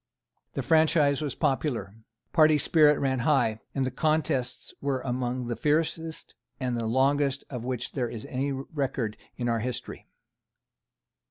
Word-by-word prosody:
The -, -, -2 dB
franchise 155 Hz, -3 st, +4 dB
was 145 Hz, -3 st, -3 dB
popular. 135 Hz, -, -1 dB, 0.4 s
Party 155 Hz, -2 st, +6 dB
spirit 150 Hz, 0 st, +5 dB
ran 130 Hz, -2 st, 0 dB
high; 120 Hz, -5 st, +2 dB, 0.2 s
and 135 Hz, -1 st, +1 dB
the 130 Hz, -, -2 dB
contests 155 Hz, -5 st, 0 dB
were 140 Hz, -2 st, -1 dB
among 125 Hz, -1 st, -2 dB
the 120 Hz, 0 st, -2 dB
fiercest 160 Hz, +2 st, -1 dB, 0.3 s
and 125 Hz, -2 st, -1 dB
the 115 Hz, -1 st, -2 dB
longest 140 Hz, +3 st, +2 dB
of 125 Hz, -3 st, -5 dB
which 125 Hz, -2 st, -3 dB
there 125 Hz, -4 st, -2 dB
is 110 Hz, -2 st, -7 dB
any 135 Hz, +2 st, -2 dB
record 135 Hz, -5 st, -2 dB, 0.2 s
in 120 Hz, -, -2 dB
our 115 Hz, -1 st, +1 dB
history. 120 Hz, +2 st, -5 dB
135 Hz, 145 wpm, -27 LUFS, 125-150 Hz, 0.4 s, Party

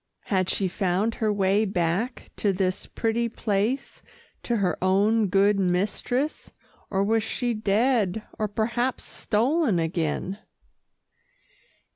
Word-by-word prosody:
Had 185 Hz, -2 st, 0 dB
she 195 Hz, -, +1 dB
found 190 Hz, +4 st, 0 dB
her 215 Hz, -1 st, +2 dB
way 200 Hz, +1 st, +2 dB
back 195 Hz, +5 st, -1 dB
to 205 Hz, -, +2 dB
this 185 Hz, -1 st, -1 dB
pretty 230 Hz, +1 st, -1 dB
place 220 Hz, +4 st, -2 dB, 0.4 s
to 235 Hz, -, -1 dB
her 185 Hz, -5 st, +1 dB
own 205 Hz, +3 st, +3 dB
good 195 Hz, +2 st, +3 dB
mistress, 205 Hz, +10 st, -1 dB, 0.4 s
or 195 Hz, 0 st, +1 dB
was 225 Hz, +2 st, +2 dB
she 240 Hz, +3 st, -2 dB
dead 215 Hz, -1 st, +1 dB, 0.2 s
or 215 Hz, -, +1 dB
perhaps 235 Hz, +4 st, -1 dB
stolen 240 Hz, -, +1 dB
again? 165 Hz, +3 st, -2 dB
205 Hz, 115 wpm, -25 LUFS, 190-230 Hz, 0.4 s, own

